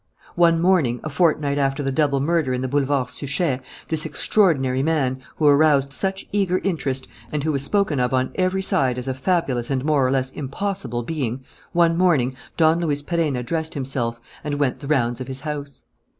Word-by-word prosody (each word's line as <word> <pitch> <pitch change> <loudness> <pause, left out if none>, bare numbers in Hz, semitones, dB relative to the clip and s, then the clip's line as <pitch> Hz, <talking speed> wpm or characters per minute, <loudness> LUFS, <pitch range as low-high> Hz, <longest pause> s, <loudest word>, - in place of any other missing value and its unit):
One 170 -1 +4
morning, 165 -9 +2
a 155 - -4
fortnight 150 -3 +1
after 135 +1 0
the 135 - -1
double 140 -1 +1
murder 150 -3 +1
in 125 - -3
the - - -1
Boulevard 135 -2 0
Suchet, 140 0 -1 0.3
this 160 -1 0
extraordinary 135 -11 +2
man, 135 -4 0
who 155 - -1
aroused 145 -2 +4
such 195 +4 -2
eager 195 -3 +1
interest 140 -8 -1 0.2
and 150 -2 -2
who 155 - +1
was 140 -2 -1
spoken 190 -3 +1
of 125 0 +1
on 130 0 0
every 190 +1 0
side 130 -8 +1
as 125 +1 -5
a 130 - 0
fabulous 130 -4 -1
and 135 -1 -1
more 150 -3 +3
or 130 - +2
less 130 0 0
impossible 140 - -4
being: 130 -3 -3 0.3
one 170 -1 +3
morning, 140 -9 +2 0.2
Don 160 0 +4
Luis 145 -4 -1
Perenna 150 -6 -1
dressed 160 +5 -2
himself 130 -4 -2 0.2
and 150 -1 -2
went 145 -3 0
the 140 - -8
rounds 125 -4 +1
of 130 - -5
his 135 0 -6
house. 145 -3 -6
145 Hz, 190 wpm, -22 LUFS, 130-165 Hz, 0.3 s, One